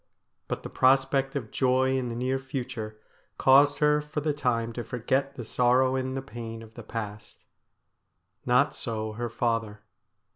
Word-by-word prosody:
But -, -, -4 dB
the -, -, -6 dB
prospect 135 Hz, +1 st, +3 dB
of 120 Hz, -6 st, -4 dB
joy 130 Hz, 0 st, +2 dB
in 130 Hz, -2 st, -1 dB
the 115 Hz, -, -4 dB
near 130 Hz, +2 st, 0 dB
future 125 Hz, -5 st, -5 dB, 0.4 s
caused 140 Hz, +2 st, +6 dB
her 150 Hz, 0 st, +3 dB
for 150 Hz, 0 st, -4 dB
the 150 Hz, 0 st, 0 dB
time 115 Hz, -5 st, -1 dB
to 120 Hz, -, -4 dB
forget 130 Hz, +4 st, -1 dB
the 120 Hz, -, -6 dB
sorrow 125 Hz, +3 st, +3 dB
and 130 Hz, 0 st, -2 dB
the 135 Hz, -, -4 dB
pain 115 Hz, -3 st, -7 dB
of 110 Hz, 0 st, -14 dB
the 120 Hz, -, -9 dB
past. 105 Hz, -2 st, -7 dB, 1.0 s
Not 125 Hz, +4 st, +3 dB
so 110 Hz, -2 st, -4 dB
her 120 Hz, +2 st, -4 dB
father. 115 Hz, -3 st, -1 dB
125 Hz, 160 wpm, -27 LUFS, 115-135 Hz, 1.0 s, caused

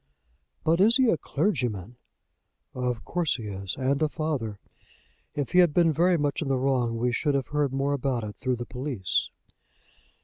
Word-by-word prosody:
"But 165 Hz, +2 st, +3 dB
is 225 Hz, +5 st, +6 dB
he 255 Hz, -4 st, +4 dB
a -, -, +3 dB
clergyman?" 125 Hz, -, -2 dB, 0.8 s
"Of 125 Hz, -2 st, -2 dB
course 175 Hz, -4 st, 0 dB
he 115 Hz, -, -6 dB
is; 100 Hz, -3 st, -5 dB
and 140 Hz, +2 st, 0 dB
a 155 Hz, -, +3 dB
father. 145 Hz, -10 st, -3 dB, 0.8 s
If 145 Hz, -3 st, -2 dB
he 180 Hz, -, +5 dB
had 175 Hz, -5 st, +5 dB
been 170 Hz, -2 st, +4 dB
very 175 Hz, +3 st, +3 dB
much 145 Hz, 0 st, -1 dB
in 155 Hz, -, -2 dB
the 135 Hz, -1 st, +1 dB
wrong 125 Hz, -3 st, +1 dB
we 120 Hz, +2 st, +1 dB
should 145 Hz, +4 st, 0 dB
have 135 Hz, -3 st, -1 dB
heard 150 Hz, -2 st, 0 dB
more 135 Hz, +1 st, 0 dB
about 130 Hz, -4 st, -1 dB
it 105 Hz, -1 st, -6 dB
through 130 Hz, -1 st, -1 dB
the 120 Hz, 0 st, -5 dB
police." 125 Hz, -8 st, -2 dB
135 Hz, 180 wpm, -27 LUFS, 120-155 Hz, 0.8 s, is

